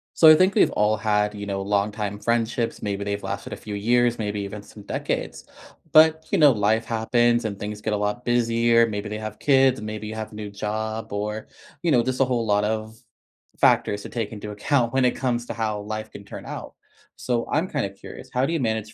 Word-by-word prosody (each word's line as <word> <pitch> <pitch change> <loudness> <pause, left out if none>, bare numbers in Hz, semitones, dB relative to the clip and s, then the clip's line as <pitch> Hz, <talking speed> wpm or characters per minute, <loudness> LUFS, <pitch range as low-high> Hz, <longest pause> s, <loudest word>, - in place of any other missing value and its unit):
So, 160 - +8
I 155 - +10
think 185 +4 +3
we've - - +5
all 105 +1 +2
had, 105 -1 +1
you 100 -1 -6
know, 100 -1 -3
longtime 105 +1 -1
friendships, 115 0 -1
maybe 100 -1 -2
they've 100 0 -3
lasted - - -5
a - - -3
few 105 -1 -7
years, 120 +3 +2
maybe 105 -1 -2
even 100 +1 -6
some 105 0 -14
decades. - - -3 0.5
But, 160 0 +6
you - - +3
know, 150 -2 +7
life 110 0 +1
happens 120 +1 +2
and 100 -2 -3
things 105 0 -5
get 110 0 -1
a - - +1
lot 105 +4 -2
busier, 115 -1 +3
maybe 105 -1 -4
they 105 - -4
have 110 0 -7
kids, 135 -2 +4
and 105 - -7
maybe 110 0 -5
you 110 - -6
have 110 -1 -5
a - - -12
new 105 -1 -6
job, 110 +1 -4
or, 105 +1 -3 0.3
you 170 -2 +1
know, 120 -4 +4
just 130 +1 -2
a 135 - +5
whole 120 -2 -1
lot 105 -1 +2
of 110 +1 -3 0.6
factors 100 - +3
to - - -8
take 115 -4 -3
into 105 0 -7
account 120 +3 0
when 130 -1 +3
it 125 - +2
comes 120 -2 -1
to - - -4
how 110 -2 -2
life 110 +1 -5
can 100 - -11
turn - - -9
out. - - -7 0.4
So, 120 -2 -2
I'm 160 +5 +1
kinda 135 -9 -1
curious, 100 +6 -11
how 125 +1 +2
do 140 - -2
you 165 - 0
manage 110 -3 -2
110 Hz, 230 wpm, -24 LUFS, 105-120 Hz, 0.6 s, I